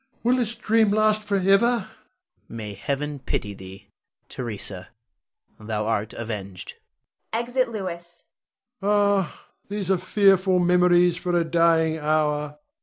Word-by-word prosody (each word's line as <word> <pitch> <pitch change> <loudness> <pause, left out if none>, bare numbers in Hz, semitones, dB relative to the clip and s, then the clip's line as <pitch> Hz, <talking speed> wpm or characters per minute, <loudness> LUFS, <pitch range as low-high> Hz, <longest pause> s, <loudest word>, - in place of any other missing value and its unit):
Will 245 +2 +3
this 235 -2 -1
dream 220 -1 +2
last 215 +1 +2
forever? 200 +3 +3
Louis. 235 -6 -2 0.7
May 105 -2 -6
Heaven 140 +7 -3
pity 105 -5 -3
thee! 95 0 -12 0.4
Theresa, 100 -6 -5 0.7
thou 105 -1 -3
art 110 -1 -1
avenged. 100 -5 -6 0.6
[Exit 245 +2 0
Louis. 175 -5 -6 0.6
Rod. 200 -1 +3
Ah, - - -19 0.2
these 200 -2 -2
are 190 - +2
fearful 190 0 +3
memories 180 -1 +4
for 175 0 -1
a - - +2
dying 165 -1 +2
hour! 150 -1 0
175 Hz, 120 wpm, -24 LUFS, 135-205 Hz, 0.7 s, memories